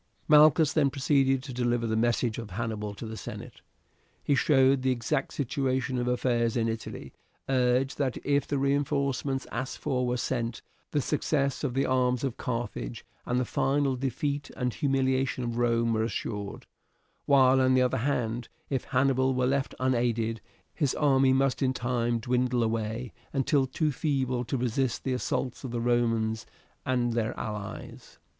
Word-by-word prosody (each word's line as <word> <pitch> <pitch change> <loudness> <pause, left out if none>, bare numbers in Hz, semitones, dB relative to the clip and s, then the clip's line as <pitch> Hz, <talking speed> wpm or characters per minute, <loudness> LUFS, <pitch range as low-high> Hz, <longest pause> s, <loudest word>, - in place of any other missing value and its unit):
Malchus 150 -1 +6
then 145 -3 +3
proceeded 135 -1 +2
to 135 -3 -7
deliver 120 -1 0
the 110 -1 0
message 120 0 +1
of 115 -3 -7
Hannibal 105 0 -4
to 115 - -7
the 110 0 -6
senate. - - -8 0.6
He 145 - +2
showed 135 -1 +4
the 130 - +1
exact 125 +2 -1
situation 130 -1 -1
of 120 - -1
affairs 120 -2 +1
in 115 -1 +1
Italy, 110 0 -5 0.3
urged 130 +1 +1
that 135 -3 0
if 140 -1 +1
the 145 - -1
reinforcements 140 -1 0
asked 130 +3 -4
for 125 -1 -1
were 125 0 0
sent, 115 -1 -2 0.3
the 145 - 0
success 140 -1 0
of 120 - -2
the 135 - +2
arms 125 -1 +1
of 130 -3 -1
Carthage 115 - -4 0.2
and 125 +1 +1
the 125 - 0
final 135 +2 +1
defeat 140 +3 -2
and 125 -2 -1
humiliation 130 -2 0
of 120 0 -3
Rome 115 -1 +2
were 110 - +1
assured; 105 -2 -4 0.6
while, 130 -2 +5
on 130 0 +4
the 130 - +4
other 125 +1 +1
hand, 120 -3 -1 0.2
if 135 -3 -1
Hannibal 130 -1 +2
were 130 0 +1
left 135 +1 0
unaided, 120 -3 0 0.3
his 145 -6 0
army 135 -3 +4
must 135 +1 +2
in 130 -1 +2
time 120 -2 0
dwindle 125 +1 +1
away 115 +1 -2 0.2
until 135 0 +2
too 150 +4 0
feeble 130 -4 -1
to 135 - -2
resist 125 0 -1
the 130 - -1
assaults 125 0 -2
of 130 - -4
the 120 0 -3
Romans 115 -2 0 0.4
and 120 -2 +1
their 115 0 -1
allies. 105 -2 -7
125 Hz, 165 wpm, -28 LUFS, 120-135 Hz, 0.6 s, Malchus